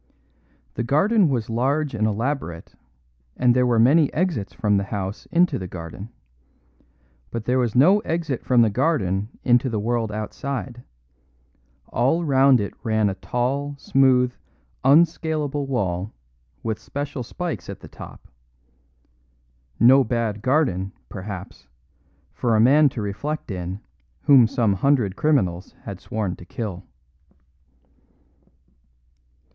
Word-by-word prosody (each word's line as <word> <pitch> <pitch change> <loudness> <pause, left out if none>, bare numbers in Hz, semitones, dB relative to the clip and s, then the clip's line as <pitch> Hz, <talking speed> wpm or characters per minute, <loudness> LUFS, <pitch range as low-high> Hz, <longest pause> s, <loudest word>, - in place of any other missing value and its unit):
The - - -3
garden 180 - +3
was 120 -5 -1
large 135 +6 0
and 110 -1 0
elaborate, 110 - -3 0.6
and 125 -1 +3
there 125 0 +3
were 120 -2 +2
many 140 +6 +4
exits 160 - -1
from 105 -4 +1
the 100 - -1
house 100 -1 -5
into 175 -4 +2
the 95 - -5
garden. 90 +4 -8 1.2
But 115 -2 -5
there 125 +2 +1
was 120 -3 -1
no 180 +11 +6
exit 165 - -3
from 125 -2 +4
the 110 - +2
garden 105 - 0
into 125 +2 +3
the 115 - -2
world 115 0 -1
outside; 125 +3 -5 1.1
all 135 +9 +1
round 135 -2 +5
it 100 - -3
ran 110 -3 +1
a - - -2
tall, 135 +7 -2
smooth, 130 -2 +3 0.5
unscalable 150 -2 +2
wall 100 -6 -2 0.5
with 110 -1 -2
special 140 +3 -5
spikes 125 - -5
at - - -8
the - - -11
top; - - -12 1.5
no 130 +3 +7
bad 110 -3 -2
garden, 125 - 0 0.2
perhaps, 95 - -8 0.7
for 115 -2 0
a - - +3
man 140 +6 +5
to 115 -4 -5
reflect 130 +7 -4
in 90 +1 -5 0.4
whom 130 -5 +6
some 115 -4 +1
hundred 110 -2 +1
criminals 95 - 0
had 100 -2 -7
sworn 105 -5 -3
to - - -12
kill. 95 0 -6
120 Hz, 125 wpm, -23 LUFS, 105-140 Hz, 1.5 s, no